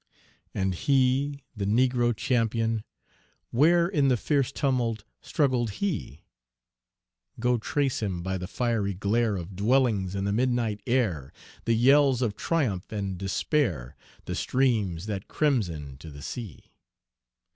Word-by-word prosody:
And 95 -1 0
he, 135 +5 +1
the 100 -2 -3
Negro 120 +1 +2
champion 115 -1 0 0.7
where 170 +7 +4
In 150 -7 +2
the 125 -2 +3
fierce 140 +2 0
tumult, 125 -7 0 0.2
struggled 130 -6 +1
he? 165 - -3 1.2
Go 125 0 +2
trace 135 +2 -1
him 95 -5 -2
by 95 +1 -2
the 90 - -5
fiery 110 -3 -1
glare 105 +3 +1
Of 90 +1 -6
dwellings 105 -3 +2
in 100 - -2
the 100 0 0
midnight 120 -3 0
air, 100 - 0 0.3
The 115 - +3
yells 135 +1 +4
of 105 -4 -1
triumph 125 - -1
and 100 -3 -3
despair, 95 - -1 0.3
The - - -4
streams 105 -10 0
that 100 -3 -4
crimson 85 - -1
to 80 - -10
the 70 -1 -10
sea! 110 - -7
115 Hz, 130 wpm, -27 LUFS, 95-130 Hz, 1.2 s, where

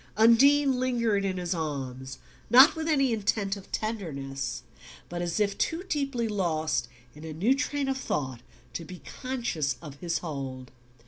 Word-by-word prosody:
Undine 265 +4 +5
lingered 235 -5 +1
in 190 -1 -1
his 175 0 -1
arms, 135 -5 -4 0.3
not 260 +6 +8
with 320 0 -3
any 275 -6 +3
intent 205 -2 0
of 195 -1 -12
tenderness, 140 - -3 0.5
but 175 0 -4
as 175 +2 -1
if 200 -1 +1
too 330 +3 0
deeply 275 -7 -1
lost 160 - 0 0.3
in 150 - -12
a 160 -1 -6
new 200 - +3
train 285 0 -1
of 265 0 -1
thought 130 - -2 0.3
to 165 - -4
be 180 +1 -10 0.2
conscious 235 - -1
of 145 -3 -10
his 170 -2 -1
hold. 135 -5 -6
195 Hz, 155 wpm, -28 LUFS, 155-250 Hz, 0.5 s, not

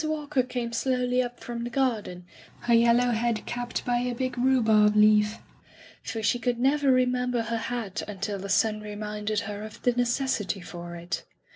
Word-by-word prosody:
Walker 300 -3 0
came 245 -2 -4
slowly 250 +1 +1
up 245 -1 -5
from 235 -1 -5
the 240 - -3
garden, 225 -9 -1 0.4
her 240 - +1
yellow 235 +1 +4
head 230 -1 0
capped 240 0 -4
by 245 -1 +1
a 245 0 -2
big 255 +1 -2
rhubarb 220 -5 +4
leaf, 210 0 +5 0.6
for 225 -2 -5
she 240 +3 +2
could 240 0 0
never 275 +2 +3
remember 250 -1 +1
her 230 0 -2
hat 225 -5 -3
until 205 0 -4
the 195 +1 -6
sun 215 +1 +2
re 210 0 -7
minded 210 0 -2
her 205 0 -6
of 215 0 -9
the 245 - +4
necessity 245 -4 0
for 175 -1 -8
it. 170 +1 -4
235 Hz, 175 wpm, -27 LUFS, 210-250 Hz, 0.6 s, leaf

